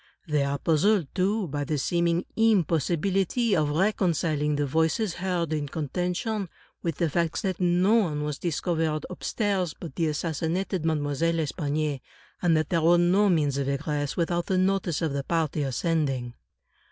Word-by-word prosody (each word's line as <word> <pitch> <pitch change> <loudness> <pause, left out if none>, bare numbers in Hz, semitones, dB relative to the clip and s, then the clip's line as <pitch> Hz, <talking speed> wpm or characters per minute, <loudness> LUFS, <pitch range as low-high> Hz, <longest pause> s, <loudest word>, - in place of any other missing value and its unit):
They 150 -2 +1
are 140 0 -1
puzzled, 165 +2 +2
too, 200 +2 0
by 145 -1 -3
the 150 +2 -1
seeming 170 +4 +1
impossibility 195 - +2
of 155 -3 +1
reconciling 160 -4 +1
the 145 0 0
voices 160 - +1
heard 175 -3 -2
in 145 -2 -2
con 150 -2 -4
tention, 180 - -2 0.3
with 165 -3 -2
the 170 - +1
facts 170 +5 -1
that 190 -3 -2
no 180 +3 +3
one 165 -10 +2
was 150 -1 -3
discovered 160 -2 -1
upstairs 185 -2 -1
but 165 -6 -7
the 165 - +1
assassinated 165 +3 -2
Mademoiselle 155 +1 0
L'Espanaye, 150 -2 -1 0.4
and 170 -3 +3
that 155 -1 -1
there 170 -2 +1
were 170 +2 +5
no 185 +4 +4
means 145 -6 +1
of 140 0 -1
egress 145 0 -2
without 175 0 0
the 190 - +1
notice 185 -3 +1
of 155 -4 0
the 140 -1 -2
party 160 -1 -1
ascending. 135 -3 -1
165 Hz, 160 wpm, -26 LUFS, 150-180 Hz, 0.4 s, were